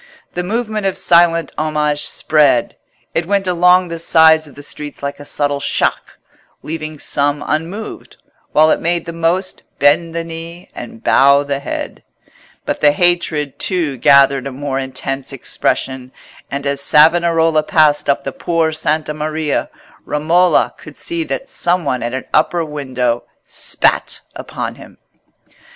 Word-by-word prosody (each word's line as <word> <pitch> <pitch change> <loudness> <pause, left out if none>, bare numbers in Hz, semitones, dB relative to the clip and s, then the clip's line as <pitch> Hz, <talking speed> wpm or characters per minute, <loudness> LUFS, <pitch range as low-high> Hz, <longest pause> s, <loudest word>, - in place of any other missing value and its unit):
The 180 - -2
movement 215 +1 -2
of 190 - -2
silent 170 -1 +3
homage 150 -1 0
spread: 150 -6 +2 0.4
it 165 0 -1
went 200 0 +1
along 180 0 +3
the 165 0 -5
sides 160 -1 +4
of 145 - -16
the 145 - -11
streets 145 0 -9
like 140 0 -4
a 145 - -10
subtle 145 0 -1
shock, 140 - -1 0.5
leaving 155 -1 -5
some 145 0 -1
unmoved, 170 +8 -4 0.3
while 155 +1 +5
it - - +2
made 170 0 0
the 170 - -6
most 170 +3 -1 0.2
bend 165 +4 +2
the 170 - -2
knee 165 +2 -9
and 230 0 -10
bow 140 +1 +5
the 140 -1 -3
head. 140 - -5 0.6
But - - -3
the 145 -1 +5
hatred, 165 -4 0
too, 165 -8 -1
gathered 140 0 +4
a - - -5
more 135 0 -3
intense 135 +1 -4
expression; 130 -1 -2 0.4
and 140 +1 -4
as 140 0 -1
Savonarola 165 +1 +4
passed 150 -2 +2
up 140 - +1
the 135 - -4
Por' 165 +2 0
Santa 155 0 -1
Maria, 155 0 -2 0.3
Romola 170 +5 +2
could - - -13
see 340 -1 -3
that - - -4
some 175 - 0
one 130 -3 -1
at 120 +2 -3
an 130 - -5
upper 165 +2 +2
window 130 -5 -2 0.2
spat - - 0
upon - - -5
him. - - -15
155 Hz, 150 wpm, -17 LUFS, 140-170 Hz, 0.6 s, while